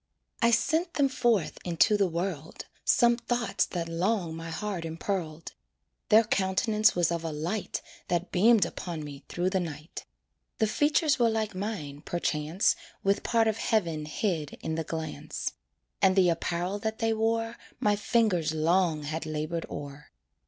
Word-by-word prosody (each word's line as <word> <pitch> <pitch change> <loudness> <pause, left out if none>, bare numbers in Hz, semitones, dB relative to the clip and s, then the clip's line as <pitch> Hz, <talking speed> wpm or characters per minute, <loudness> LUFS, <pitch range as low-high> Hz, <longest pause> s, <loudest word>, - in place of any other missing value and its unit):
I 235 - +5
sent 320 +9 +1
them 285 -2 +4
forth 240 -8 +1
into 175 +4 +3
the 200 -2 +3
world, 170 -3 -4 0.2
Some 235 -1 +4
thoughts 240 0 0
that 170 -2 -3
long 175 0 0
my 165 0 -6
heart 195 0 -3
impearled. 165 -1 -4 0.6
Their 220 +2 +7
countenance 210 +2 +2
was 175 -1 +2
of 170 -1 -2
a 165 - -2
light 170 +8 -3 0.2
That 175 +1 -1
beamed 215 +3 +5
upon 165 -4 -5
me 145 -1 -9
through 180 +1 -1
the 190 - +2
night. 155 -3 -6 0.5
The 220 - +3
features 290 +5 +2
were 235 -1 +4
like 220 -1 -1
mine, 185 -8 -4
perchance, 160 +1 0 0.3
With 195 +1 +2
part 230 -1 +2
of 220 -1 +1
heaven 165 -8 0
hid 155 -1 -2
in 160 - -3
the 160 0 -1
glance; 160 -1 -4 0.5
And 190 -1 +5
the 185 -2 +5
apparel 175 +3 -1
that 220 +1 -2
they 225 -1 +1
wore 225 +1 0 0.2
My 210 -1 +3
fingers 200 -7 +1
long 165 -1 +2
had 155 +2 -4
labored 155 +2 -3
o'er. 145 0 -8
185 Hz, 155 wpm, -28 LUFS, 160-220 Hz, 0.6 s, Their